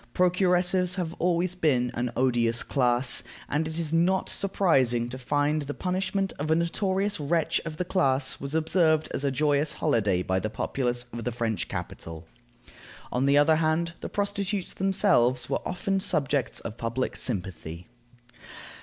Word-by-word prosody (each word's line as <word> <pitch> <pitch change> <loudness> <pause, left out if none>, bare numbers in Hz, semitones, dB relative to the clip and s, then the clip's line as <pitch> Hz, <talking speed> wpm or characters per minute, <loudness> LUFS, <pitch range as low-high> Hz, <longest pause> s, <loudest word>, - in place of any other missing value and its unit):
Procuresses 180 0 +2
have 175 -4 -3
always 175 0 +1
been 130 -9 +1
an 120 0 -2
odious 120 -2 +1
class, 125 -1 +1 0.3
and 155 +2 0
it 160 +1 -5
is 165 -2 -3
not 180 +3 +2
surprising 130 -12 +1
to 130 - -6
find 145 +4 0
that - - -6
the 145 - -4
punishment 190 +1 -1
of 150 +2 -2
a 160 - +4
notorious 190 +4 0
wretch 160 +2 +1
of 160 -2 -6
the 180 - -2
class 135 -8 +1
was 140 +2 -4
observed 160 -1 +2
as 135 - -1
a 140 - +2
joyous 145 +2 +1
holiday 100 -5 +1
by 95 0 0
the 110 - -3
populace 120 +1 -2
of 120 0 -5
the 125 - -2
French 115 -2 -2
capital. 80 +1 -7 0.9
On 130 +2 +1
the 140 +1 +4
other 155 +2 +5
hand, 165 +1 0
the - - -6
prostitutes 200 -1 -2
themselves 185 - +2
were - - 0
often 195 +2 -1
subjects 145 - 0
of 115 +1 -7
public 115 +3 -2
sympathy. 90 -6 -3
150 Hz, 160 wpm, -27 LUFS, 125-180 Hz, 0.9 s, other